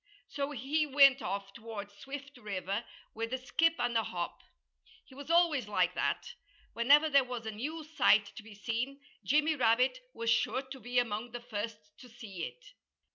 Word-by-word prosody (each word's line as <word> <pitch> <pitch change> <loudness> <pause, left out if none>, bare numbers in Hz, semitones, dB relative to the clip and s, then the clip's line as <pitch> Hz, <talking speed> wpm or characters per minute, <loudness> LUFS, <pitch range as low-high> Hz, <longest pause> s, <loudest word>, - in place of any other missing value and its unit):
So 280 0 -3
he 295 +3 0
went 275 -1 +6
off 195 0 -4
toward 220 -3 -7
Swift 275 +6 -9
River 200 -1 -3 0.3
with 230 +1 -4
a - - +1
skip 320 +6 +2
and 245 -1 -1
a 225 - +4
hop. 175 -5 -4 0.6
He - - -18
was 280 +3 -10
always 335 -8 +3
like 210 - +2
that. 485 - -1 0.4
Whenever 285 +7 +5
there 280 -3 +5
was 245 -2 -6
a 220 - -3
new 300 +10 -5
sight 255 -9 +4
to - - -8
be 215 -1 -13
seen, 235 +6 -3 0.2
Jimmy 305 +3 +3
Rabbit 250 - +3 0.2
was 230 0 0
sure 260 +3 +1
to 265 0 -9
be 245 +2 -4
among 235 0 0
the 240 - -4
first 225 -2 -4 0.2
to 250 - -13
see 220 -7 -7
it. - - -12
245 Hz, 180 wpm, -32 LUFS, 220-280 Hz, 0.6 s, went